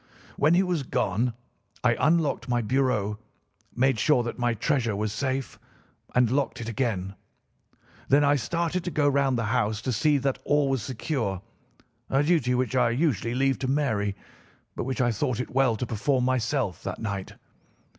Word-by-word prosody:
"When 155 +4 +3
he 185 - +4
was 180 -4 -1
gone 115 -1 0 0.5
I 120 -1 +4
unlocked 155 -1 +1
my 120 -1 +1
bureau, 110 -4 0 0.6
made 130 -1 +2
sure 135 -2 +3
that 120 +1 -5
my 120 -1 +1
treasure 115 -2 0
was 105 0 -2
safe, 130 +2 -3 0.6
and 125 -2 +4
locked 140 +1 0
it 115 - -5
again. 110 -6 -2 1.0
Then 145 +2 +5
I 145 0 +4
started 170 +5 -1
to - - -1
go 145 -3 +1
round 140 -2 +2
the 115 - -1
house 105 -3 +1
to 130 - -1
see 145 +6 +3
that 135 -1 -1
all 145 -2 +2
was 135 -3 0
secure—a 120 - -4
duty 145 -6 +2
which 125 +1 -1
I 125 -2 +4
usually 120 - 0
leave 135 +1 +1
to 130 - -2
Mary 110 -8 0 0.6
but - - -3
which 130 0 -2
I 120 -1 +2
thought 120 +2 -1
it 125 - -4
well 130 -3 +3
to 115 - -3
perform 125 +3 0
myself 130 - 0
that - - -5
night. 100 -3 -4
130 Hz, 170 wpm, -26 LUFS, 115-140 Hz, 1.0 s, Then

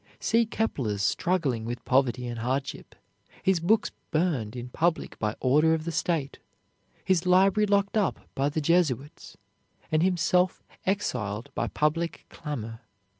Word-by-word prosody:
See 230 -1 +2
Kepler 135 - -1
struggling 135 - 0
with 120 +2 -5
poverty 125 -1 +2
and 120 -1 -5
hardship, 130 +4 -3 0.5
his 190 -2 +3
books 205 +6 +2 0.2
burned 155 -10 0
in 125 0 -6
public 165 +5 -1
by 105 0 -1
order 150 +5 +4
of 160 -1 -5
the 170 - -2
state, 160 -4 -1 0.7
his 185 -2 +2
library 195 +3 +4
locked 200 0 +1
up 210 -4 +1
by 140 +1 +1
the 155 +2 -2
Jesuits, 150 -3 0 0.5
and 155 0 +3
himself 180 0 +2 0.2
exiled 120 - -2
by - - -1
public 165 +3 -1
clamor. 115 -8 -6
155 Hz, 135 wpm, -27 LUFS, 125-180 Hz, 0.7 s, order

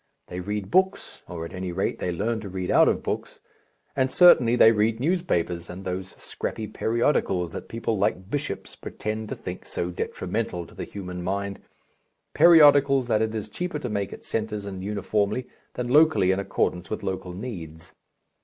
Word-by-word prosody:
They 90 - -5
read 105 +2 -4
books 190 +1 +1
or, 85 -1 -6
at - - -9
any 90 -1 -4
rate, 95 +3 -2
they 90 - -1
learn 110 +6 -1
to 105 -2 -7
read 95 -1 -3
out - - +6
of - - +1
books - - -4 0.6
and 130 -1 +2
certainly 130 -7 +6
they 115 -2 +7
read 110 +1 +1
newspapers 120 - 0
and 90 +2 -8
those 95 0 -4
scrappy 110 - -5
periodicals 110 - 0
that - - -8
people 115 -2 -2
like 95 -2 0
bishops 145 -1 -4
pretend 110 0 -5
to - - -3
think - - -7
so 90 +1 -3
detrimental 85 0 -3
to - - -16
the - - -6
human 90 -3 -7
mind, 100 +2 -3 0.7
periodicals 145 -6 +6
that 110 -1 +3
it 110 0 -1
is 105 -1 -3
cheaper 175 +8 -4
to 130 -5 -4
make 100 -2 -2
at - - -10
centres 105 -2 -3
and 95 -2 -6
uniformly, 105 +3 -1 0.3
than 125 - -3
locally 145 - +5
in 95 - 0
accordance 90 -2 -1
with 110 - -4
local 95 -2 -4
needs. 85 -7 -8
105 Hz, 175 wpm, -25 LUFS, 90-120 Hz, 0.7 s, they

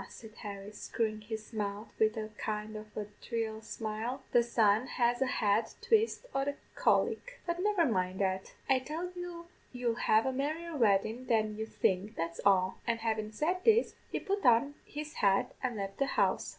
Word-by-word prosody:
said 220 -2 -11
Harry, 200 -1 -7
screwin' 215 0 -2
his 220 +1 -7
mouth 205 0 -3
wid 220 +1 +3
a 215 0 -3
kind 215 0 -4
of 215 0 -7
a 210 - -2 0.2
dhry 225 -2 -3
smile, 220 +4 -4
'the 240 - +6
sun 225 0 +3
has 240 0 +1
a 265 - +3
hard 215 -2 +2
twist 450 +2 +2
o' 270 - +1
the 285 +1 -2 0.2
cholic; - - +1
but 345 0 -1
never 410 -4 +3
mind 185 -6 0
that, 190 -1 0 0.2
I 265 -1 +4
tell 320 +7 -4
you 350 -1 -6 0.3
you'll 245 -2 0
have 220 0 +3
a 265 - 0
merrier 310 +5 -2
weddin' 225 +1 +2
than 215 -3 +2
you 220 +1 -4
think, 200 +1 0
that's 165 0 -3
all;' 190 -2 +3
and 230 -1 +1
havin' 220 -1 -1
said 345 +11 -1
this, 450 +1 +5 0.2
he - - -1
put 400 -1 -2
on 245 +3 +5
his 300 +1 -6
hat 200 +5 +3
and 250 -3 -1
left 195 -1 -4
the 275 - +2
house. - - +1
225 Hz, 185 wpm, -32 LUFS, 210-275 Hz, 0.3 s, the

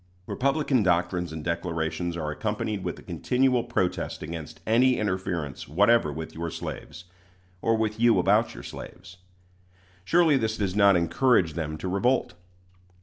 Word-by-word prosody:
Republican 140 - +1
doctrines 90 -1 0
and 80 -1 -6
declarations 85 0 -2
are 75 -2 -3
accompanied 105 +3 -3
with - - -4
a - - -13
continual 125 -1 +1
protest 95 -10 -2
against 80 -1 -7
any 125 +3 +4
interference 90 -8 -3
whatever 100 +1 +3
with 80 +2 -7
your 85 +1 -4
slaves, 80 +1 -7 0.6
or 115 0 +2
with 110 0 -1
you 120 -1 +5
about - - +2
your - - -9
slaves. 90 0 -10 0.9
Surely 165 - +4
this 110 -3 -1
does 100 -2 -1
not 100 -2 +6
encourage 85 +1 +2
them 75 -1 -4
to 95 - -5
revolt. 110 +5 +1
95 Hz, 145 wpm, -26 LUFS, 85-115 Hz, 0.9 s, not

